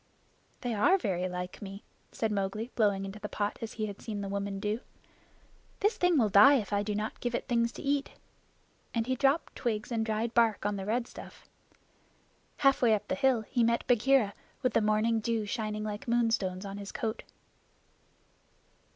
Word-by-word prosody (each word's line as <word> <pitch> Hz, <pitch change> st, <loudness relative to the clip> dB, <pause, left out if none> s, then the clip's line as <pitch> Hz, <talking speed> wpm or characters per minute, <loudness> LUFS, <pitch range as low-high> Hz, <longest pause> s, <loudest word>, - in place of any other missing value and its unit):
"They 245 Hz, -2 st, -2 dB
are 350 Hz, -, +4 dB
very 185 Hz, -, -1 dB
like 180 Hz, 0 st, -6 dB
me," 200 Hz, 0 st, -8 dB, 0.3 s
said 225 Hz, -1 st, -1 dB
Mowgli, 210 Hz, +4 st, -2 dB
blowing 200 Hz, -3 st, +2 dB
into 195 Hz, +2 st, -7 dB
the 210 Hz, -, -5 dB
pot 205 Hz, 0 st, -2 dB
as 225 Hz, -, -5 dB
he 215 Hz, -, -2 dB
had 205 Hz, -2 st, -7 dB
seen 210 Hz, -3 st, -4 dB
the 200 Hz, -, -4 dB
woman 200 Hz, 0 st, -3 dB
do. 210 Hz, +2 st, -1 dB, 1.0 s
"This 415 Hz, +3 st, +2 dB
thing 355 Hz, -2 st, +3 dB
will 230 Hz, -5 st, +4 dB
die 210 Hz, +8 st, +8 dB
if 210 Hz, -6 st, -1 dB
I 200 Hz, -, +2 dB
do 205 Hz, 0 st, -2 dB
not 210 Hz, +1 st, -3 dB
give 240 Hz, -1 st, -2 dB
it -, -, -3 dB
things 235 Hz, -2 st, +1 dB
to -, -, -9 dB
eat"; 280 Hz, 0 st, 0 dB, 0.9 s
and 230 Hz, -1 st, +1 dB
he 260 Hz, -, 0 dB
dropped 275 Hz, +5 st, +1 dB
twigs 215 Hz, -1 st, -2 dB
and 225 Hz, -1 st, 0 dB
dried 220 Hz, +1 st, -1 dB
bark 225 Hz, -4 st, +3 dB
on 205 Hz, 0 st, 0 dB
the 195 Hz, 0 st, -5 dB
red 235 Hz, +2 st, 0 dB
stuff. -, -, -12 dB, 1.1 s
Halfway 255 Hz, -5 st, +4 dB
up 205 Hz, 0 st, -6 dB
the -, -, +1 dB
hill 250 Hz, +3 st, +2 dB
he 235 Hz, +2 st, 0 dB
met 235 Hz, +1 st, +1 dB
Bagheera 245 Hz, -3 st, +3 dB, 0.3 s
with 255 Hz, -3 st, +1 dB
the -, -, +3 dB
morning 215 Hz, +2 st, +2 dB
dew 220 Hz, 0 st, -1 dB
shining 215 Hz, -1 st, -3 dB
like 210 Hz, +1 st, -5 dB
moonstones 225 Hz, -5 st, +1 dB
on 195 Hz, 0 st, -6 dB
his 200 Hz, -1 st, -7 dB
coat. 225 Hz, -4 st, -3 dB
215 Hz, 185 wpm, -30 LUFS, 205-235 Hz, 1.1 s, die